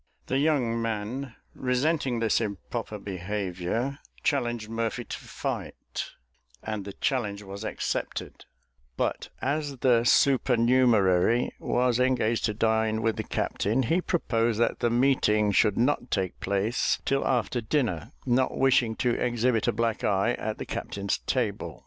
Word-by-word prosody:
The 135 - 0
young 130 -6 +1
man, 115 +4 -3 0.2
resenting 130 0 0
this 115 -1 +2
improper 100 -5 -4
behaviour, 100 +6 -3 0.2
challenged 120 -6 0
Murphy 115 +2 -2
to - - -6
fight, - - -5 0.6
and 110 -3 -4
the 100 - -6
challenge 105 -6 -1
was 100 +1 -8
accepted; - - -4 0.5
but - - -1
as 145 0 -1
the 120 -2 +3
supernumerary 120 -5 +4
was 125 -1 +1
engaged 125 -3 +2
to 110 - 0
dine 110 0 +1
with 115 -1 +1
the - - -3
captain, 115 +6 0
he 165 +9 +1
proposed 115 - 0
that 120 - +1
the 120 - +2
meeting 115 -4 +3
should 105 0 +3
not 125 0 +1
take 95 -2 -1
place 100 +5 0
till 135 0 +1
after 120 -1 0
dinner, 110 - -1
not 130 0 +1
wishing 125 -4 +3
to 125 - +1
exhibit 120 -1 +1
a - - +4
black 115 0 -1
eye 100 +3 +2
at 110 -2 -4
the - - -5
captain's 100 0 -3
table. - - -2
115 Hz, 135 wpm, -27 LUFS, 105-130 Hz, 0.6 s, supernumerary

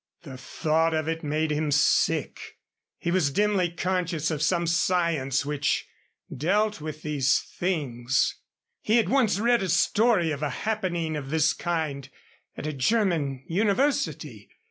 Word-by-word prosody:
The 135 -5 -9
thought 160 +5 0
of 155 0 -1
it 165 0 -3
made 155 +1 -1
him 150 0 -1
sick. 145 +1 +1 0.4
He 170 - -2
was 175 -5 +2
dimly 200 +2 +1
conscious 175 -2 -1
of 155 -2 -3
some 170 +2 +1
science 165 -6 +1
which 145 0 -1 0.5
dealt 210 +3 0
with 155 0 -7
these 140 -3 +2
things. 135 -8 -1 0.4
He 220 +2 +2
had 230 - +2
once 245 -7 +2
read 235 +1 +3
a 190 - -2
story 175 0 +2
of 145 -1 -4
a 150 - -1 0.2
happening 175 -7 -1
of 140 -3 -5
this 160 0 +2
kind 155 -6 -3 0.5
at - - -6
a 155 - -2
German 145 - 0
university. 210 - -1
160 Hz, 145 wpm, -26 LUFS, 150-185 Hz, 0.5 s, read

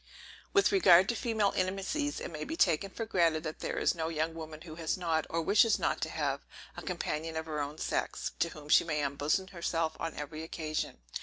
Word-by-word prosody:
With 400 0 +4
regard 190 - +7
to 235 - +1
female 220 -4 +1
intimacies, 195 +11 -1
it - - -5
may 155 -1 -5
be 320 - -4
taken 180 - +3
for 225 +4 -4
granted 165 -6 +2
that 155 -1 -5
there - - -3
is - - +3
no 165 -2 -2
young 160 0 -1
woman 160 -1 -8
who 165 -2 -9
has 160 +1 -2
not, 165 -3 0
or 165 0 -1
wishes 215 +6 +5
not - - 0
to - - -1
have, - - -1 0.3
a - - -6
companion 165 -2 -3
of 160 - -3
her 155 -2 -3
own 145 +2 -4
sex, - - -2
to 170 - +2
whom 150 -2 -11
she - - +6
may 150 -3 -1
unbosom 145 +7 0
herself 165 -3 -1
on 165 -1 -3
every 150 +2 -6
occasion. 155 - -3
165 Hz, 215 wpm, -31 LUFS, 155-190 Hz, 0.3 s, regard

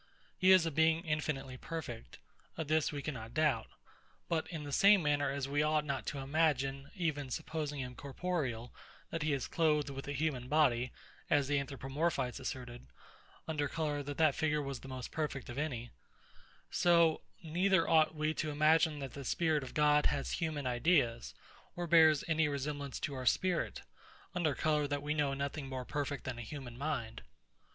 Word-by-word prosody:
He 185 - +3
is 185 -3 +7
a 165 - -1
Being 160 +2 +3
infinitely 145 -4 -2
perfect: 130 -7 -7 0.4
Of 160 -2 -3
this 155 0 +2
we 145 -2 -5
cannot 120 -6 -6
doubt. 150 -8 +2 0.6
But 160 -2 0
in 160 -3 -6
the 145 - -6
same 200 +4 +6
manner 145 -1 +2
as 140 -1 -2
we 145 +1 +1
ought 150 0 +2
not 140 -2 -3
to 145 - -3
imagine, 140 -1 0
even 155 -7 -2
supposing 150 0 -3
him 125 -1 -5
corporeal, 135 -4 -3 0.4
that 165 - -3
he 155 0 +1
is 135 -3 -1
clothed 150 -3 +1
with 135 0 -7
a - - -3
human 140 -4 -1
body, 130 -5 +2 0.4
as 145 -2 +3
the 145 0 +2
ANTHROPOMORPHITES 135 0 -2
asserted, 125 - -6 0.6
under 150 -2 -1
colour 150 -2 -2
that 145 0 -6
that 155 -3 +4
figure 150 0 +1
was 140 -2 -4
the - - -11
most 130 -1 -6
perfect 150 -5 -3
of 120 +3 -4
any; 120 -6 -3 0.8
so, 170 -2 +4 0.2
neither 175 +2 +2
ought 160 -1 +4
we 155 +1 0
to 155 - -2
imagine 155 +1 +3
that 135 -3 -6
the 140 - -7
spirit 155 +3 +1
of 130 - -9
God 150 0 +4
has 140 -1 -2
human 155 -5 -2
ideas, 125 -2 +1 0.4
or 175 - -3
bears 160 -3 +6
any 160 -1 +2
resemblance 140 -1 -3
to 145 - -2
our 130 -2 -4
spirit, 180 +5 +1 0.5
under 165 -6 0
colour 150 +1 +1
that 145 0 -2
we 150 +1 0
know 145 -2 0
nothing 140 0 -4
more 130 -1 -4
perfect 145 0 -3
than 125 -2 -5
a - - -4
human 125 0 -7
mind. 120 -5 -3
145 Hz, 175 wpm, -34 LUFS, 135-155 Hz, 0.8 s, is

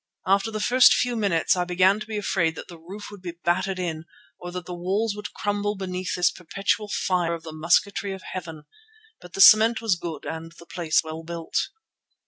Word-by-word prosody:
After 195 +3 +2
the 215 -1 -4
first 250 +4 +6
few 245 -1 0
minutes 195 -8 +2
I 180 - 0
began 185 +3 +3
to 215 - -8
be 220 -1 -4
afraid 175 -5 0
that - - -8
the 170 -2 -11
roof 195 +6 -10
would 205 -2 -11
be 175 -2 -7
battered 180 +3 0
in, 165 -3 -4 0.3
or 175 - -7
that 180 -1 -6
the 180 - -6
walls 195 +5 -1
would 210 0 -7
crumble 205 0 -1
beneath 185 -2 -4
this 175 -1 +3
perpetual 195 +4 -2
fire 175 -4 0
of 165 - -11
the 160 - -8
musketry 195 +5 +1
of 190 -1 -7
heaven. 165 -5 -7 0.6
But 180 - -13
the 195 - 0
cement 220 +3 +8
was 225 -5 +1
good 165 -4 -6
and 165 +1 -6
the 170 - -15
place 165 -2 0
well 160 0 -7
built. 165 - -3
180 Hz, 205 wpm, -24 LUFS, 170-205 Hz, 0.6 s, cement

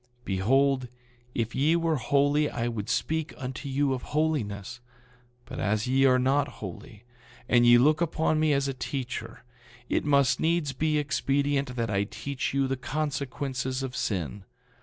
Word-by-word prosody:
9:48 - - -32
Behold, 130 +7 +2 0.5
if 115 0 -1
ye 150 +5 +3
were 165 -2 +1
holy 145 +4 +2
I 120 0 -2
would 115 -3 -4
speak 160 0 -1
unto 130 +1 -6
you 135 0 +1
of 130 - -3
holiness; 125 -9 -2 0.7
but - - -7
as 105 +1 0
ye 135 +2 +3
are 130 -1 +5
not 135 +3 +2
holy, 100 +2 -9 0.4
and 120 -1 +4
ye 120 0 +8
look 150 +6 +4
upon 160 -1 +1
me 155 -1 +3
as 140 -1 +1
a 135 - -2
teacher, 125 -4 -5 0.5
it - - +1
must 140 -3 +3
needs 160 -4 +1
be 155 +3 0
expedient 140 -2 0
that 115 -2 -1
I 100 0 +1
teach 140 +5 -4
you 135 0 +1
the 135 0 -2
consequences 135 -2 -3
of 130 -1 -5
sin. 95 0 -2
135 Hz, 160 wpm, -27 LUFS, 120-145 Hz, 0.7 s, ye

